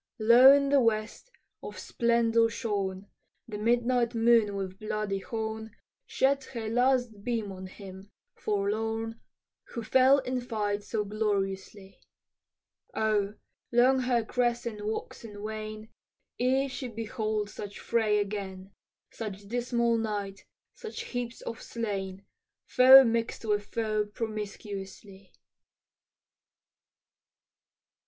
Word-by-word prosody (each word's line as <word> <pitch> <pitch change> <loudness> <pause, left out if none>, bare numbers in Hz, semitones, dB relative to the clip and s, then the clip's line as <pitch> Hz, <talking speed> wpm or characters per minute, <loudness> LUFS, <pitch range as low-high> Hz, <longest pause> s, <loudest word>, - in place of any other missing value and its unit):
Low 235 +4 +8
in 280 0 +4
the 280 0 +5
west, 225 - -1 0.3
of - - -8
splendor 230 -1 +2
shorn, 200 -5 -3 0.4
The 210 -2 -6
midnight 240 +1 +1
moon 225 -3 +4
with 190 -1 -5
bloody 210 -2 -2
horn 220 +1 -5 0.3
Sheds 275 0 +1
her 230 -4 -5
last 245 -3 +1
beam 225 -4 -2
on 185 0 -8
him, 190 0 -11 0.2
forlorn, 225 +2 -2 0.4
Who 235 - -6
fell 260 +4 +5
in 255 -2 -2
fight 210 -4 -2
so 210 +1 -2
gloriously; 195 -2 -3 1.0
Oh! 210 -1 +1 0.4
long 250 +2 +4
her 245 -3 +1
crescent 240 -3 -1
wax 220 +2 -4
and 205 -2 -9
wane 215 0 -6 0.5
Ere 265 +2 +2
she 255 0 -5
behold 215 -2 -3
such 205 -1 -8
fray 220 -3 +1
again, 195 -2 -4 0.4
Such 205 -3 -7
dismal 235 0 0
night, 205 -3 -4 0.3
such 445 - -7
heaps 245 -1 -5
of 230 - -6
slain, 195 -4 -4 0.4
Foe 260 +1 +9
mix'd 230 -1 -1
with 205 -1 0
foe 215 -2 -1
promiscuously. 200 -3 -7
220 Hz, 110 wpm, -29 LUFS, 205-235 Hz, 1.0 s, Foe